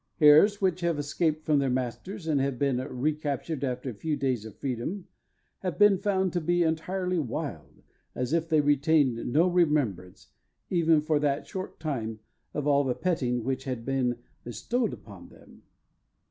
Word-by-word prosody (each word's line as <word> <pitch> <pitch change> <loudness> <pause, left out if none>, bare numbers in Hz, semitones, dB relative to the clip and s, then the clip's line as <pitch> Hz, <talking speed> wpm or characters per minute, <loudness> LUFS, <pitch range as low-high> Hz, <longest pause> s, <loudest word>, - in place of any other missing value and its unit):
Hares 155 +7 +6
which 185 -2 0
have 170 -2 0
escaped 155 +2 -1
from 150 -2 +3
their 135 -1 +1
masters, 130 - -3
and 150 -4 +1
have 135 -2 -1
been 140 -1 +1
recaptured 145 +3 -2
after 125 0 -2
a - - -9
few 150 +8 -2
days 130 -5 -1
of 110 - -10
freedom, 140 - -4 0.5
have 180 -6 -4
been 205 -2 +5
found 190 -3 0
to 175 - 0
be 175 +2 +2
entirely 180 +3 -1
wild, 135 -7 -5 0.3
as 125 +3 -2
if 165 0 0
they 155 -2 +4
retained 145 -4 +2
no 165 +7 +4
remembrance, 150 - 0 0.4
even 165 -3 +3
for 150 0 +1
that 145 0 0
short 190 -1 -7
time, 120 -9 -3 0.4
of 150 - -2
all 145 -1 +3
the 130 -2 -1
petting 125 -10 -1
which 130 +1 -2
had 125 -3 -4
been 130 -3 0 0.3
bestowed 235 - -2
upon - - -11
them. - - -18
150 Hz, 165 wpm, -28 LUFS, 130-170 Hz, 0.5 s, Hares